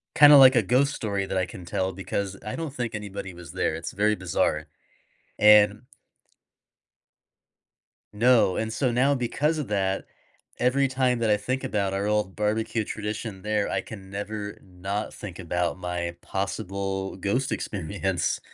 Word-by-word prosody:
kinda 145 -1 +9
like 130 -1 +8
a 120 - +5
ghost 135 +7 +2
story 100 -3 -2
that 95 - -3
I 90 - +1
can 90 -1 -10
tell, 95 +2 -1
because 95 +1 -3
I 105 - -4
don't 160 -4 -5
think 120 -3 -3
anybody 100 -3 -6
was 85 -4 -11
there, - - 0
it's 80 - -5
very 105 +2 +2
bizarre, 80 -4 -1 0.7
and 105 0 +6 2.3
No, 115 -4 +4
and 110 0 -2
so 130 +1 0
now 135 +4 +3
because 145 +5 0
of 145 - -3
that, 95 -2 0 0.5
every 135 +3 +3
time 130 -2 +1
that 110 -2 +1
I 105 - +5
think 130 +6 -3
about 100 -6 -1
our 100 +1 -1
old 105 -3 0
barbecue 110 +1 0
tradition 105 -2 -5
there, 105 -1 0
I - - 0
can 95 -3 -10
never 105 +1 -5
not 95 +3 -5
think 95 -4 -8
about 90 -1 -2
my 90 -1 -3
possible 95 0 -3
ghost 120 +8 -1
experience. 95 -1 -2
105 Hz, 155 wpm, -26 LUFS, 95-120 Hz, 2.3 s, kinda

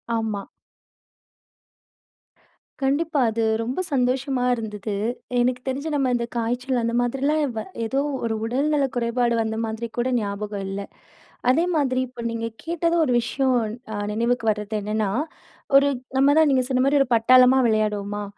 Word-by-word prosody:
ஆமா. 220 -3 -2 2.4
கண்டிப்பா, 295 +3 +1
அது 225 +1 -1 0.2
ரொம்ப 245 +8 -3
சந்தோஷமா 255 0 0
இருந்தது. 210 -2 -5 0.5
எனக்கு 250 +1 +1
தெரிஞ்சு, 275 +4 -2
நம்ம 270 -3 +1
இந்த 235 -1 -1
காய்ச்சல் 245 +2 -1
அந்த 230 - -1
மாதிரிலாம், 275 +5 0
வ 220 - -2 0.2
ஏதோ 270 +5 0 0.3
ஒரு 225 -1 -1
உடல்நல 280 +4 +1
குறைபாடு 235 0 +1
வந்த 220 0 -2
மாதிரி 220 +1 -4
கூட 240 +2 +1
ஞாபகம் 205 -1 -4
இல்ல. 195 +1 -4 0.7
அதே 325 +7 +2
மாதிரி, 265 -4 +1
இப்ப 245 -1 -9
நீங்க 230 0 -3 0.2
கேட்டதும் 335 0 +1
ஒரு 250 - +1
விஷயம், 260 +2 0 0.4
அ - - -3 0.2
நினைவுக்கு 230 +1 0
வர்றது 210 0 -4
என்னன்னா, 210 0 -1 0.7
ஒரு 280 +1 +4 0.3
நம்ம 280 +2 +5
தான் 315 -2 +5
நீங்க 260 -1 +3
சொன்ன 255 0 +2
மாரி, 285 +1 +3
ஒரு 270 - +1
பட்டாளமா 255 +3 +6
விளையாடுவோமா, 210 -2 -1
245 Hz, 140 wpm, -23 LUFS, 220-270 Hz, 2.4 s, பட்டாளமா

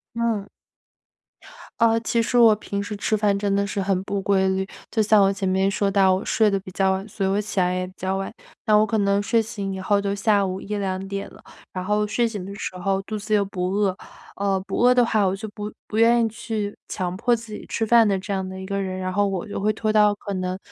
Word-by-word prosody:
嗯。 225 -4 -1 1.3
呃， 230 0 +4
其 230 0 0
实 245 - -1
我 230 -3 +7
平 200 -1 -4
时 210 +1 -5
吃 215 - 0
饭 205 -1 +2
真 200 -1 0
的 200 - +1
是 200 0 -3
很 190 -1 0
不 200 0 -2
规 190 0 +2
律。 190 +1 -1 0.2
就 225 - 0
像 210 -1 +5
我 195 0 +4
前 195 -1 -2
面 190 +1 +2
说 200 0 0
到， 190 -1 +4
我 190 - -2
睡 220 -2 +3
得 195 -1 0
比 185 - -11
较 190 +1 +2
晚， 190 +2 -3
所 200 -1 -2
以 - - +1
我 200 +2 +1
起 205 - -5
来 180 0 +2
也 185 0 -2
比 185 - -14
较 190 +1 -2
晚， 195 - -4 0.4
那 215 -2 +5
我 215 - +5
可 220 0 0
能 200 0 +2
睡 225 +2 +2
醒 200 -3 -4
以 190 - -5
后， 205 +2 +2
就 200 0 -1
下 200 -1 +2
午 185 +1 -4
1-2 200 -2 -3
点 200 0 -4
了。 - - -16 0.3
然 185 - -4
后 210 +2 +1
睡 235 +3 +1
醒 205 -5 -6
的 200 +1 -7
时 190 - -5
候， 195 +1 0
肚 215 +2 -5
子 215 +2 -6
又 210 -1 +4
不 180 -2 -3
饿， 195 -1 +1 0.4
呃， 195 -1 0
不 195 - -4
饿 250 +1 +6
的 245 - +5
话， 215 -3 +2
我 190 - +1
就 220 +2 -6
不 210 0 -6
不 215 - -6
愿 235 +1 +5
意 225 - +2
去 220 -2 -4
强 180 -2 -3
迫 240 +4 +2
自 225 -1 -7
己 - - -8
吃 225 - -2
饭 230 0 +6
的 195 -2 +1
这 190 +2 -9
样 190 -1 -1
的 190 0 -7
一 190 - -7
个 200 0 -2
人， 185 -1 -4
然 185 0 -3
后 205 +2 +1
我 195 +1 -3
就 - - -4
会 210 +2 +1
拖 215 0 -2
到， 210 -1 +4
可 200 -1 -6
能， 185 0 -3
200 Hz, 280 characters per minute, -23 LUFS, 190-215 Hz, 1.3 s, 我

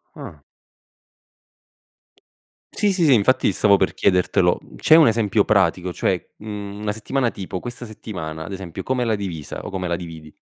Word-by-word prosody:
Ah. - - -10 2.3
Sì, 205 -2 +1
sì, 180 -3 +1
sì 140 - +6
infatti 130 +4 +3
stavo 100 -2 +4
per 95 - 0
chiedertelo. 90 -2 +2 0.2
C'è 160 - +5
un 160 -6 +7
esempio 110 -2 +2
pratico? 90 -3 +1
Cioè, 90 -1 -1
mhmm, 105 -1 -7
una 105 -1 -1
settimana 115 +3 -1
tipo: 95 -1 -6
questa 120 0 -7
settimana, 80 -7 -7
ad - - -8
esempio, 95 -1 -7
come 130 -1 -1
l'hai 110 -2 +1
divisa 90 -7 -6
o - - -5
come 90 -2 -3
la 85 - 0
dividi? 80 -3 -9
100 Hz, 160 wpm, -21 LUFS, 90-115 Hz, 2.3 s, un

